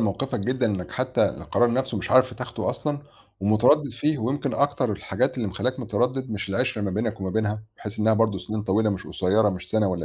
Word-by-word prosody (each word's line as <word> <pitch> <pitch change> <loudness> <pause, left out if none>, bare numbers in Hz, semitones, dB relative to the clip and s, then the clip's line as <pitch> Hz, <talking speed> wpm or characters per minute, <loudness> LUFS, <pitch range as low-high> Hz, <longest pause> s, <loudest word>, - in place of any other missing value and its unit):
موقفِك 110 +2 -1
جدًا 125 +2 0
إنَّك 95 -4 -2
حتّى - - +1
القرار 120 0 +1
نَفْسه 130 +1 -1
مش - - -5
عارف 130 -1 +5
تاخده 125 -2 -3
أصلًا 145 -1 -3 0.4
ومتردِّد 120 +8 +4
فيه 150 +5 0
ويمكن 130 +6 -1
أكتر 140 -5 +1
الحاجات 130 +6 -1
اللي 110 -5 -1
مخلّياك 125 +8 -2
متردّد 125 +3 -1
مش 100 -2 -4
العِشرة 115 +2 0
ما 100 - -1
بينَك 105 +1 -2
وما 95 -1 -2
بينها، 110 0 -1
بحيث 105 +1 -8
إنّها 110 +1 +4
برضه 110 -3 +2
سِنين 105 +4 -4
طويلة 105 +2 +2
مش 95 -2 -4
قصيرة، 105 +3 +2
مش 90 -1 -5
سَنة 110 -2 +2
والّا 85 -3 -2
110 Hz, 205 wpm, -25 LUFS, 100-130 Hz, 0.4 s, عارف